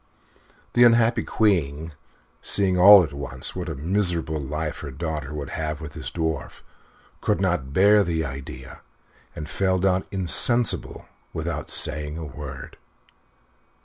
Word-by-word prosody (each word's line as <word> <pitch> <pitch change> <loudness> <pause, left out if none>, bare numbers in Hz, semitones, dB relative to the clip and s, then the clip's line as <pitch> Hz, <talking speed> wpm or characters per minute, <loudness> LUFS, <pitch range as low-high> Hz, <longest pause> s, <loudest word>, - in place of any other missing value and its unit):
The 120 - +5
unhappy 115 0 +4
Queen, 80 -7 -1 0.5
seeing 95 -2 +1
all 95 +1 +8
at 80 - -6
once 70 0 -3
what 90 -2 -5
a 80 - -4
miserable 85 0 -2
life 75 +3 -4
her 75 - -7
daughter 75 0 -5
would 75 -2 -6
have 75 -1 -4
with 75 -2 -9
this - - -6
Dwarf 80 -2 -4 0.6
could - - 0
not 90 -8 -1
bear 100 +6 +4
the 80 -3 -2
idea, 65 -2 -9 0.5
and 75 - -7
fell 95 +2 0
down 95 0 0
insensible 100 +6 +1 0.3
without - - -4
saying 75 0 +2
a 80 - -6
word. 70 -2 -9
80 Hz, 135 wpm, -23 LUFS, 75-95 Hz, 0.6 s, all